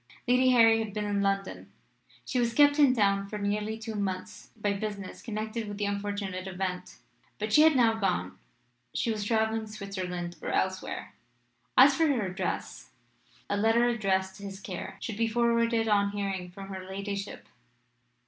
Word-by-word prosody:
Lady 255 Hz, +1 st, +4 dB
Harry 225 Hz, -2 st, +6 dB
had 210 Hz, -2 st, -8 dB
been 210 Hz, 0 st, -1 dB
in 205 Hz, -1 st, 0 dB
London; 195 Hz, -1 st, -2 dB, 0.5 s
she 255 Hz, -, -1 dB
was 235 Hz, -1 st, 0 dB
kept 290 Hz, 0 st, +5 dB
in 275 Hz, -3 st, +6 dB
town 200 Hz, -2 st, +2 dB
for 210 Hz, -, -4 dB
nearly 210 Hz, +2 st, -1 dB
two 225 Hz, 0 st, -6 dB
months 190 Hz, -3 st, -4 dB
by 205 Hz, -2 st, 0 dB
business 200 Hz, -1 st, -5 dB
connected 220 Hz, 0 st, -4 dB
with 205 Hz, 0 st, -6 dB
the 205 Hz, -, -1 dB
unfortunate 200 Hz, -2 st, -3 dB
event; 185 Hz, -1 st, -4 dB, 0.4 s
but 215 Hz, 0 st, -3 dB
she 300 Hz, -, +7 dB
had 315 Hz, -1 st, +6 dB
now 235 Hz, -3 st, +5 dB
gone 185 Hz, -, -1 dB, 0.6 s
she 230 Hz, -, 0 dB
was 215 Hz, -2 st, -2 dB
travelling 220 Hz, 0 st, 0 dB
Switzerland 185 Hz, -4 st, -5 dB
or -, -, -4 dB
elsewhere. 190 Hz, 0 st, -2 dB, 0.6 s
As 275 Hz, +2 st, +9 dB
for 325 Hz, +2 st, +3 dB
her 250 Hz, -8 st, +1 dB
address, 185 Hz, +1 st, -4 dB, 0.6 s
a 205 Hz, -, 0 dB
letter 225 Hz, +3 st, +3 dB
addressed 190 Hz, -5 st, 0 dB
to 200 Hz, -, -12 dB
his 195 Hz, -1 st, -7 dB
care 185 Hz, -3 st, -7 dB
should 220 Hz, -3 st, -5 dB
be 230 Hz, 0 st, +2 dB
forwarded 230 Hz, 0 st, +2 dB
on 200 Hz, -1 st, +3 dB
hearing 195 Hz, -3 st, -3 dB
from 195 Hz, +2 st, -10 dB
her 190 Hz, -1 st, -6 dB
ladyship. 200 Hz, +1 st, -5 dB
205 Hz, 165 wpm, -29 LUFS, 195-225 Hz, 0.6 s, As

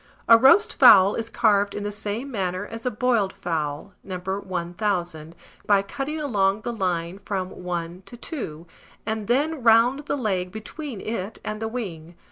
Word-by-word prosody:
A 230 Hz, -, +9 dB
roast 270 Hz, -, +5 dB
fowl 195 Hz, 0 st, +8 dB
is 225 Hz, 0 st, -3 dB
carved 205 Hz, -4 st, +2 dB
in 205 Hz, -, -4 dB
the 205 Hz, -, -3 dB
same 215 Hz, +6 st, -4 dB
manner 185 Hz, -3 st, -2 dB
as 225 Hz, +3 st, -6 dB
a -, -, +3 dB
boiled 220 Hz, -4 st, 0 dB
fowl, 155 Hz, +2 st, -4 dB
No. 185 Hz, -2 st, -5 dB
1000; 180 Hz, -2 st, -3 dB
viz., -, -, -27 dB, 0.3 s
by 200 Hz, -1 st, +4 dB
cutting 275 Hz, +9 st, -4 dB
along 205 Hz, -8 st, +1 dB
the 240 Hz, -, -4 dB
line 180 Hz, -3 st, -2 dB
from. 190 Hz, -3 st, -3 dB
1 175 Hz, 0 st, -5 dB
to 240 Hz, -, -10 dB
2, 170 Hz, -, -6 dB, 0.4 s
and 220 Hz, -1 st, -3 dB
then 290 Hz, +4 st, +1 dB
round 240 Hz, +5 st, +4 dB
the -, -, -1 dB
leg 190 Hz, -7 st, -1 dB
between 220 Hz, -, -7 dB
it 215 Hz, -1 st, -4 dB
and 215 Hz, +1 st, -4 dB
the 225 Hz, -, -1 dB
wing. 175 Hz, -8 st, -6 dB
205 Hz, 170 wpm, -24 LUFS, 185-230 Hz, 0.4 s, A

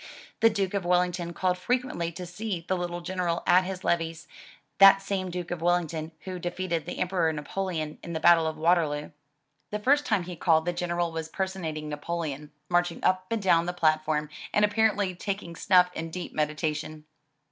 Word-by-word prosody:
The 225 Hz, -, +6 dB
Duke 200 Hz, -3 st, -1 dB
of 200 Hz, -2 st, -1 dB
Wellington 180 Hz, -1 st, +1 dB
called 180 Hz, +1 st, 0 dB
frequently 245 Hz, -7 st, -1 dB
to 180 Hz, +2 st, -6 dB
see 180 Hz, -1 st, -4 dB
the 185 Hz, -, +1 dB
little 175 Hz, -1 st, -3 dB
General 175 Hz, -1 st, -2 dB
at 185 Hz, +1 st, +5 dB
his 185 Hz, 0 st, -5 dB
levees 165 Hz, -1 st, -1 dB, 0.5 s
(that 195 Hz, 0 st, +9 dB
same 195 Hz, -1 st, -3 dB
Duke 175 Hz, -1 st, -5 dB
of 175 Hz, -2 st, -3 dB
Wellington 165 Hz, -2 st, 0 dB
who 185 Hz, -1 st, -6 dB
defeated 175 Hz, -2 st, -3 dB
the -, -, -5 dB
Emperor 180 Hz, -3 st, +1 dB
Napoleon 155 Hz, 0 st, -4 dB
in 170 Hz, -, -7 dB
the 160 Hz, -, -2 dB
battle 165 Hz, 0 st, +5 dB
of 160 Hz, 0 st, -3 dB
Waterloo). 155 Hz, -3 st, +1 dB, 0.6 s
The 210 Hz, -, -2 dB
first 280 Hz, +7 st, +2 dB
time 210 Hz, -5 st, +2 dB
he 180 Hz, 0 st, -7 dB
called 160 Hz, -1 st, +3 dB
the 175 Hz, -, 0 dB
General 175 Hz, -1 st, -1 dB
was 160 Hz, 0 st, -5 dB
personating 165 Hz, -5 st, -3 dB
Napoleon, 150 Hz, -1 st, -4 dB, 0.2 s
march 175 Hz, 0 st, +2 dB
ing -, -, -11 dB
up 185 Hz, 0 st, +2 dB
and 225 Hz, -3 st, -2 dB
down 170 Hz, -2 st, +4 dB
the 180 Hz, -, -1 dB
platform, 155 Hz, -2 st, +1 dB, 0.2 s
and 210 Hz, -, +4 dB
apparently 205 Hz, -2 st, +1 dB
taking 190 Hz, -2 st, -5 dB
snuff 180 Hz, 0 st, +4 dB
in 165 Hz, -1 st, -5 dB
deep 180 Hz, +2 st, -6 dB
meditation. 155 Hz, 0 st, -2 dB
175 Hz, 180 wpm, -27 LUFS, 160-185 Hz, 0.6 s, that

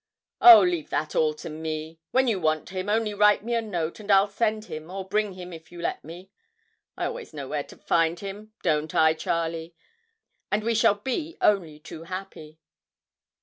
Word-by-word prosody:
'Oh, 230 Hz, -3 st, +11 dB
leave 175 Hz, -4 st, -1 dB
all 155 Hz, 0 st, +1 dB
that -, -, -20 dB
to -, -, -6 dB
me. 160 Hz, +1 st, -5 dB
When 260 Hz, 0 st, +2 dB
you 215 Hz, -5 st, +1 dB
want 155 Hz, -2 st, 0 dB
him, 190 Hz, +1 st, -4 dB
only 215 Hz, 0 st, +1 dB
write 210 Hz, 0 st, +4 dB
me 235 Hz, +2 st, -3 dB
a 230 Hz, -, +1 dB
note, 175 Hz, -6 st, -4 dB
and 210 Hz, -1 st, -11 dB
I'll 195 Hz, 0 st, +5 dB
send 215 Hz, +1 st, -1 dB
him 155 Hz, -2 st, -8 dB
or 190 Hz, 0 st, -6 dB
bring 210 Hz, 0 st, 0 dB
him 180 Hz, -1 st, -9 dB
if 160 Hz, 0 st, -12 dB
you 175 Hz, -, -10 dB
let 170 Hz, -, -3 dB
me. 175 Hz, +5 st, -11 dB, 0.7 s
I -, -, -2 dB
always 485 Hz, -, -6 dB
know 140 Hz, -2 st, -6 dB
where 150 Hz, +1 st, -2 dB
to -, -, -15 dB
find 165 Hz, 0 st, +1 dB
him 205 Hz, +2 st, -8 dB
don't 155 Hz, -2 st, 0 dB
I, 160 Hz, 0 st, +5 dB
Charlie? 165 Hz, 0 st, -3 dB, 0.8 s
and 210 Hz, +1 st, +1 dB
we 230 Hz, +1 st, +1 dB
shall 225 Hz, -2 st, +4 dB
be 265 Hz, +10 st, -4 dB
only 175 Hz, -7 st, +2 dB
too 160 Hz, +1 st, -10 dB
happy.' 175 Hz, -4 st, -8 dB
185 Hz, 190 wpm, -26 LUFS, 160-210 Hz, 0.8 s, Oh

